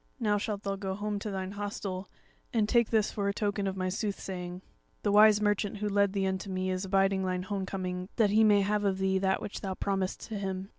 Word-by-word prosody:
Now 210 -3 +2
shalt 205 -1 -3
thou 195 0 -2
go 190 -1 -3
home 205 0 -2
to 210 - -4
thine 190 -1 -3
hostel, 200 -2 -4 0.4
and 220 -3 +2
take 235 0 +3
this 220 -2 +2
for 200 -1 -2
a - - 0
token 205 -1 -1
of 190 0 -3
my 185 0 -1
sooth 200 +2 -2
saying. 180 -1 -6 0.4
The 205 - +2
wise 210 0 +7
merchant 205 0 0
who 210 +1 -2
led 200 -1 +2
thee 195 -1 0
unto 190 +1 -2
me 185 0 -1
is 185 +1 -2
abiding 195 0 +2
thine 185 -1 -1
homecoming 185 -1 -3
that 210 -3 +3
he 220 +1 +5
may 205 -2 +5
have 205 +1 +1
of 195 -2 +1
thee 190 0 +1
that 190 0 +1
which 210 - -6
thou 190 -2 -3
promisedst 195 -1 -2
to 215 -2 -3
him. 190 0 -4
195 Hz, 235 wpm, -30 LUFS, 190-205 Hz, 0.4 s, wise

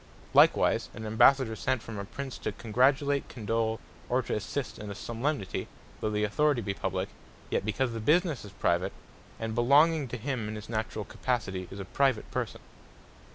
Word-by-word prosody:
Likewise, - - +5
an 110 - -6
Ambassador 115 +2 +5
sent 130 +2 -1
from 110 -3 -6
a 100 - -4
Prince, 135 +5 -6
to - - -2
congratulate, 135 +5 +2
condole, 115 0 -1 0.3
or 125 +1 +2
to - - -3
assist 125 +6 -3
at 105 - -6
a 100 - -5
solemnity, 115 -1 -2 0.3
though 110 - -1
Authority 120 +5 +2
be 100 0 -1
Publique; 95 0 -2 0.4
yet - - +1
because 115 +5 0
the 115 - -3
businesse 155 - +2
is 100 - -10
Private, 90 +3 +1 0.5
and 115 0 -3
belonging 145 +6 +4
to 125 - -5
him 125 -2 -3
in 110 - -4
his 105 +1 -8
naturall 110 -2 -2
capacity; 100 -5 -2
is 95 - -8
a 95 - -5
Private 130 +2 +1
person. - - -3
115 Hz, 170 wpm, -29 LUFS, 105-135 Hz, 0.5 s, Likewise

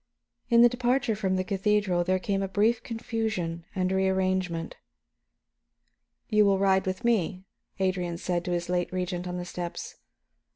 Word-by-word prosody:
In 235 -1 +7
the - - +9
departure 245 0 +1
from 190 -2 0
the 185 - 0
cathedral 195 -2 +1
there 185 +2 +1
came 195 +1 -1
a 195 - -1
brief 215 +5 +2
confusion 220 -8 -3
and 185 -1 0
rearrangement. 185 -3 0 1.5
"You 215 -1 +4
will 200 -1 +4
ride 190 -1 +2
with 185 +6 -3
me," 190 -5 +1 0.3
Adrian 185 -2 -1
said 175 0 -1
to 180 - -2
his 175 0 -1
late 180 0 -1
Regent, 180 -1 -3
on 180 0 -4
the 175 - -4
steps. 175 -1 -6
190 Hz, 155 wpm, -27 LUFS, 180-210 Hz, 1.5 s, the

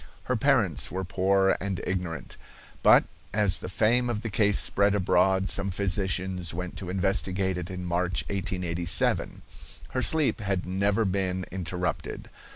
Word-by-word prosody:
Her 125 - -1
parents 110 - +2
were 95 +1 -4
poor 95 +1 +2
and 95 -2 -3
ignorant, 90 -3 -4 0.5
but, - - +7 0.3
as 100 -3 +3
the - - -6
fame 120 +5 +2
of 105 -3 -2
the 115 - -5
case 105 -1 +2
spread 100 0 +2
abroad, 95 0 +2
some 100 0 0
physicians 95 -2 -1
went 90 0 -5
to 95 - -6
investigate 95 0 0
it 90 - -6
in 90 -1 -6
March, 90 +1 -1
1887. 90 -3 -1 0.5
Her 130 - -2
sleep 155 -1 +2
had 95 -3 -2
never 100 +4 +1
been 95 -1 -1
interrupted. 90 0 -4
95 Hz, 145 wpm, -27 LUFS, 90-100 Hz, 0.5 s, but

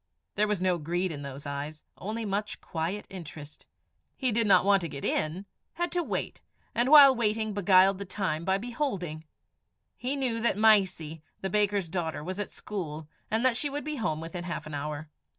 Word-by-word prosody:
There 210 +1 +2
was 210 -3 0
no 180 -1 +1
greed 175 +4 -1
in 145 -2 -6
those 140 0 -7
eyes 145 +2 -5
only 220 +3 -4
much 205 +1 -2
quiet 170 +5 -3
interest. 155 -5 -10 0.5
He 260 -3 +1
did 225 0 +3
not 195 - +5
want 200 -1 +5
to 170 - -3
get 140 -1 -6
in; 160 +6 -1 0.3
had 345 +1 -2
to 355 - +1
wait, - - -4 0.3
and 240 +3 +2
while 285 -3 +10
waiting 220 -2 0
beguiled 195 -1 +5
the 200 - -4
time 180 -5 -2
by 190 +2 +2
beholding. 200 - -3 0.7
He 260 +3 -2
knew 250 -5 -1
that 235 -4 +2
Mysie, 190 -8 +3 0.2
the 190 - -3
baker's 205 -3 +2
daughter, 160 -3 -3
was 185 +4 -5
at 205 - -3
school, 160 -7 -6 0.2
and 225 +3 +1
that 255 -2 +4
she 290 +4 0
would 290 +1 -4
be 305 -1 -4
home 155 -10 -1
within 165 +2 -6
half 175 -2 -4
an 155 - -8
hour. 150 +2 -4
190 Hz, 190 wpm, -28 LUFS, 160-220 Hz, 0.7 s, while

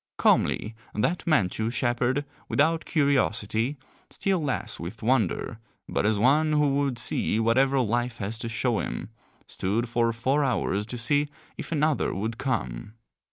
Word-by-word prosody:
Calmly 110 - +2 0.2
that 165 - 0
Manchu 110 - +2
shepherd, 120 +3 0 0.2
without 160 +3 +2
curiosity, 130 - +1 0.3
still 190 -4 0
less 125 -6 -2
with 95 +7 -7
wonder, 115 -2 0 0.3
but - - 0
as 110 -1 +2
one 150 +8 +3
who 150 -2 +3
would 140 -3 0
see 115 -2 0
whatever 130 +4 +3
life 120 +1 -1
has 105 +2 -4
to 115 - -4
show 115 -1 0
him, - - -4 0.4
stood 110 +6 -1
for 115 0 +1
four 130 +6 +1
hours 105 -5 0
to 125 - -5
see 145 +5 +2 0.3
if - - -7
another 155 -1 +1
would 110 +4 -3
come. 105 - -3
120 Hz, 145 wpm, -26 LUFS, 110-140 Hz, 0.4 s, one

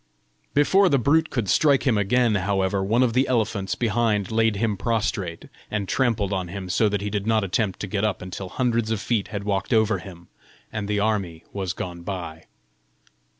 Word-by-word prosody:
Before 190 +7 +4
the 140 - +3
brute 155 +5 +2
could 120 -6 -2
strike 140 - +3
again, 115 0 +2
however, 95 0 0
one 115 +6 +2
of 120 -3 +1
the 130 +3 +2
elephants 110 -5 0
behind 110 -4 0
laid 110 -1 +2
him 105 0 0
prostrate, 105 -5 -2 0.2
and 105 -2 -2
trampled 110 -6 +1
on 95 -2 -2
him 95 +1 -6
so 105 +4 +2
that 100 -1 -1
he 105 0 -3
did 100 0 -2
not 110 -1 +2
attempt 95 0 -1
to 105 - -3
get 100 +1 -2
up 105 -3 0
until 90 +1 -7
hundreds 115 0 0
of 110 -2 0
feet 110 -1 -1
had 100 -1 -5
walked 100 +1 -2
over 110 -1 +3
him, 85 -3 -12 0.5
and 105 -2 -3
the 105 0 0
army 100 -6 -1
was 95 -3 -2
gone 85 -1 -6
by. 85 -4 -6
105 Hz, 190 wpm, -24 LUFS, 95-115 Hz, 0.5 s, Before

